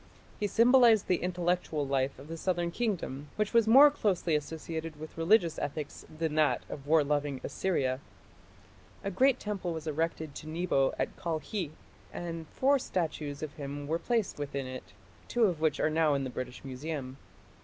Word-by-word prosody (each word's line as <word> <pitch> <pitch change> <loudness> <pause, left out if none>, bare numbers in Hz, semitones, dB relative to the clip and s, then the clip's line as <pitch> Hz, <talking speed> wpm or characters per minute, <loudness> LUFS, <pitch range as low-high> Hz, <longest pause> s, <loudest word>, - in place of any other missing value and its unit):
He 210 - +1
symbolized 235 -1 +6
the 180 - +2
intellectual 175 -4 0
life 135 0 0
of 135 +3 -12
the 165 - -5
southern 175 0 -1
kingdom, 170 - -2
which 210 +1 -1
was 230 -2 +5
more 275 +6 +9
closely 195 - 0
associated 160 +1 -4
with 155 0 -9
religious 170 0 +3
ethics 145 0 -5
than 160 0 -3
that 155 -1 +2
of 140 -1 -7
war 155 0 +5
loving 145 -2 -1
Assyria. 135 -9 0 1.0
A 200 - -2
great 260 +7 +3
temple 195 -5 -3
was 160 -1 -6
erected 160 -1 -2
to 155 - -9
Nebo 160 -5 +1
at - - -2
Kalkhi, 170 +2 -3 0.4
and 165 -2 -5
four 275 - +2
statues 155 - -3
of 150 -2 -5
him 145 0 -5
were 165 +2 0
placed 230 -8 -1
within 140 -2 -3
it, 130 0 -8 0.3
two 240 - +1
of 175 -7 +2
which 155 -2 +2
are 155 - +2
now 155 -2 +3
in 140 - -1
the 130 - -4
British 125 +1 -6
Museum. 135 0 -5
160 Hz, 170 wpm, -30 LUFS, 145-185 Hz, 1.0 s, more